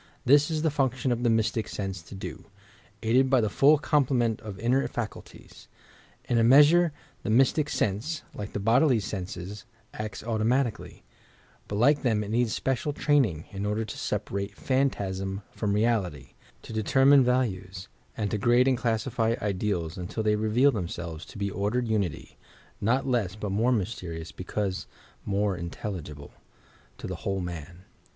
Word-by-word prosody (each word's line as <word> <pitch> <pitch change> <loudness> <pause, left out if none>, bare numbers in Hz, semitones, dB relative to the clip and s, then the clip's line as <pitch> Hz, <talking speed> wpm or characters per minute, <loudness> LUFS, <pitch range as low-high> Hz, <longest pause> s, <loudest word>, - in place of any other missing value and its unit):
This 145 +4 +5
is 155 -1 -1
the 160 - +2
function 130 -2 0
of 120 0 0
the 120 - +2
Mystic 110 0 +1
Sense 95 -4 -4
to 80 - -11
do, 95 - -7 0.6
aided 125 +4 +3
by 130 -1 +4
the 110 -3 0
full 145 +7 +5
complement 125 -6 +1
of 105 -3 -7
inner 125 +6 +1
facnltiea. 120 -3 -8 0.6
In 120 - +1
a - - +4
measure 150 +7 +6 0.3
the - - -4
Mystic 135 +6 +3
Sense, 115 - -1
like 105 0 -7
the - - -2
bodily 120 +5 +4
senses, 95 0 -6 0.3
acts 105 -2 -6
automatically, 115 +2 -1 0.6
but 100 - -4
like 140 +7 +4
them 110 -5 +1
it 105 - -6
needs 120 0 +1
special 135 +5 -1
training 130 - +1
in 100 0 -5
order 105 +2 -1
to 105 - -7
separate 100 0 -3
phantasm 100 -8 -1
from 105 -2 -2
reality, 100 - 0 0.3
to - - -9
determine 135 +5 +5
values, 100 -7 -1 0.3
and 105 -2 -2
to 105 - -1
grade 120 +4 +4
and 130 -3 +2
classify 115 0 0
ideals 95 -5 -2
until 90 +5 -4
they 105 0 +3
reveal 110 +6 +3
themselves 85 - -5
to - - -12
be 100 0 -2
ordered 105 +5 -1
unity, 90 -10 -2 0.4
not 120 +6 +1
less 115 -8 0
but 105 -2 -4
more 115 +6 +2
mysterious 90 -8 -3
because 95 +1 -3 0.4
more 100 -1 0
intelligible... 85 -4 -6 0.7
to - - -8
the - - -4
whole 95 -1 -2
man." 85 0 -7
110 Hz, 155 wpm, -27 LUFS, 95-125 Hz, 0.7 s, measure